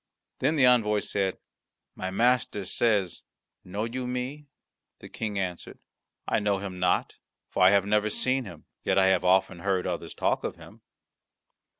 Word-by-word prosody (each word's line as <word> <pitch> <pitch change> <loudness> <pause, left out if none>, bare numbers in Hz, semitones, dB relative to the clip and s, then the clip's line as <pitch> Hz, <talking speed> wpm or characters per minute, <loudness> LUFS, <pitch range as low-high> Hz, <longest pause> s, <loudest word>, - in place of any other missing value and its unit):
Then 155 - +1
the 140 -4 +5
envoy 110 -4 +4
said, 95 -2 -1 0.6
"My 95 - -4
master 115 -1 +1
says, 100 -2 +1 0.4
'Know 100 +4 -4
you 125 +2 -4
me?'" 130 +4 -4 0.5
The - - -12
King 105 -2 -4
answered, 90 -3 -4 0.5
"I - - +2
know 105 -1 +1
him 95 -2 -6
not, 90 0 0 0.3
for - - -1
I 90 - +8
have 100 0 +3
never 105 +1 +2
seen 130 +4 +1
him; 85 -6 -11 0.2
yet - - +1
I 95 0 +5
have 95 -1 +2
often 95 0 +2
heard 95 0 0
others 85 -2 -4
talk - - 0
of - - -3
him." - - -15
100 Hz, 165 wpm, -27 LUFS, 95-120 Hz, 0.6 s, I